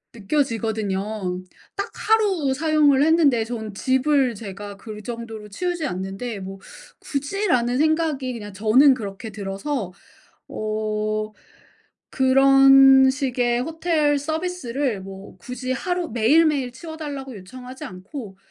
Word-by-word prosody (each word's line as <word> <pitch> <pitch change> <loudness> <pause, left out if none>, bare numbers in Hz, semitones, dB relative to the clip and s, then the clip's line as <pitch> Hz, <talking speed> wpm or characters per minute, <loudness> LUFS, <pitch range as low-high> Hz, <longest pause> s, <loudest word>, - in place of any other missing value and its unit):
느껴지거든요. 215 -5 -2 0.3
딱 400 - -4
하루 400 -10 +2
사용을 295 -2 +3
했는데 295 -8 +3
저는 220 -3 -6
집을 260 +2 +2
제가 200 -1 -8
그 215 0 -9
정도로 225 -3 -7
치우지 350 - -3
않는데 195 +3 -5
'뭐 195 0 -7 0.4
굳이.' 290 +9 -3
라는 245 -3 +2
생각이 310 -4 +1
그냥 205 -4 -8
저는 250 +7 +5
그렇게 210 0 -7
들어서 195 +2 -4 0.6
어 215 0 -2 0.8
그런 270 0 +6
식의 250 -3 0
호텔 315 -1 +1
서비스를 290 - -2
뭐 195 0 -11
굳이 255 +6 -5
하루 355 +4 -2
매일매일 270 +3 +3
치워 315 +5 -9
달라고 280 -5 -6
요청하지 250 +7 -10
않고 195 +3 -9
255 Hz, 260 characters per minute, -23 LUFS, 215-290 Hz, 0.8 s, 그런